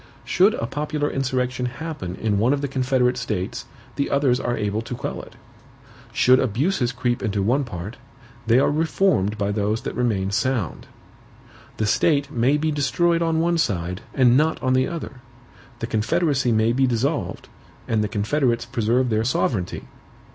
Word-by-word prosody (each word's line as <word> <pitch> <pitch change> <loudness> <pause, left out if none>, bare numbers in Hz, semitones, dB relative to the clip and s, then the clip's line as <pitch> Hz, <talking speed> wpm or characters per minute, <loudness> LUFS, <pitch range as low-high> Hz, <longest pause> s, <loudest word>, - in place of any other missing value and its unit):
"Should 195 +4 +3
a - - -3
popular 150 +3 -2
insurrection 130 -1 -1
happen 130 - -6
in 105 -1 0
one 120 +6 +3
of 140 - -1
the 145 - -1
confederate 130 -2 +1
states 95 -4 -3 0.3
the 140 - 0
others 135 -3 +2
are 120 -1 -2
able 105 0 -1
to 120 +2 -6
quell - - -5
it. - - -15 0.8
Should 130 +1 +4
abuses 125 - 0
creep 120 -1 -1
into 105 -4 -1
one 130 +7 +2
part, 105 -2 -7 0.5
they 115 +2 +5
are 135 - +3
reformed 150 - +1
by 100 -1 -1
those 105 +2 -1
that - - -5
remain 105 -6 0
sound. 120 -2 -1 0.9
The 110 - 0
state 140 +5 +2
may 130 +3 +2
be 155 +1 0
destroyed 170 +4 +1
on 165 -1 +1
one 170 0 +1
side, 90 - -1
and 125 -3 +5
not 155 +4 +2
on 130 0 +2
the 130 0 +2
other; 150 -6 -7 0.6
the 115 - -4
confederacy 130 +4 +1
may 110 +1 +2
be 135 +1 +2
dissolved, 120 - -2 0.4
and 110 -1 +1
the - - 0
confederates 120 +3 0
preserve 120 +1 0
their 110 0 +1
sovereignty." 110 -6 -1
125 Hz, 165 wpm, -23 LUFS, 110-145 Hz, 0.9 s, they